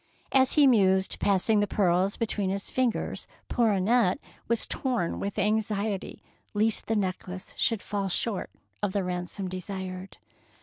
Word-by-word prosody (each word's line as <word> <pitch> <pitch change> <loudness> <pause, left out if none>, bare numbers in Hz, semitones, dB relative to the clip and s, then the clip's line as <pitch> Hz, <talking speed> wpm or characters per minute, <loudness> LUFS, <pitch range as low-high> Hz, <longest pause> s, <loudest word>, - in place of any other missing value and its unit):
As 265 -1 +4
he 295 - +6
mused, 190 -6 +3
passing 205 +2 +3
the 205 - +2
pearls 190 0 +2
between 210 -4 -1
his 200 +1 -3
fingers, 255 -3 -1 0.2
poor 235 -2 +3
Annette 200 0 +3 0.3
was 235 0 +2
torn 245 -11 -1
with 200 +1 -4
anxiety 210 -1 -1 0.3
lest 215 +1 +1
the 225 - +1
necklace 185 -1 -3
should 225 -4 +1
fall 200 -2 -2
short 200 +2 -1 0.3
of 205 -2 -1
the 200 - 0
ransom 180 +2 -3
desired. 185 0 -6
200 Hz, 140 wpm, -28 LUFS, 185-220 Hz, 0.3 s, he